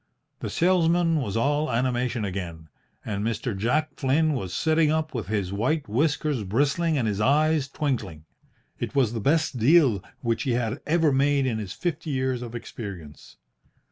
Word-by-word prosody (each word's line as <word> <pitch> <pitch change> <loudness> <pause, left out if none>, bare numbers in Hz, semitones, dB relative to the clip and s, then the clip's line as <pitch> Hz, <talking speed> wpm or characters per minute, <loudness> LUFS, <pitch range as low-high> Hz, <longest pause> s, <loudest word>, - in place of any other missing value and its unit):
The - - -4
salesman 170 -1 +2
was 105 -4 -2
all 145 +5 +1
animation 120 -1 0
again, 85 -5 -6 0.4
and 105 -2 -3
Mr. 115 0 -2
Jack 140 +10 0
Flynn 155 +4 +2
was 95 -10 -3
sitting 160 - +2
up 155 0 -1
with 115 -8 -4
his 100 -3 -2
white 135 +9 0
whiskers 145 +1 0
bristling 145 - +1
and 120 -4 0
his 105 -1 -1
eyes 150 +3 +3
twinkling. 115 - -3 0.5
It - - -4
was 125 -5 +2
the 115 - -2
best 145 +1 +1
deal 125 - +4 0.2
which 115 -2 0
he 130 -4 0
had 120 +2 -1
ever 160 -1 +3
made 140 0 +2
in 115 -4 -1
his 100 -4 -5
fifty 165 -2 -3
years 130 -2 -1
of 120 -1 -7
experience. 100 -10 -9
130 Hz, 165 wpm, -25 LUFS, 110-155 Hz, 0.5 s, deal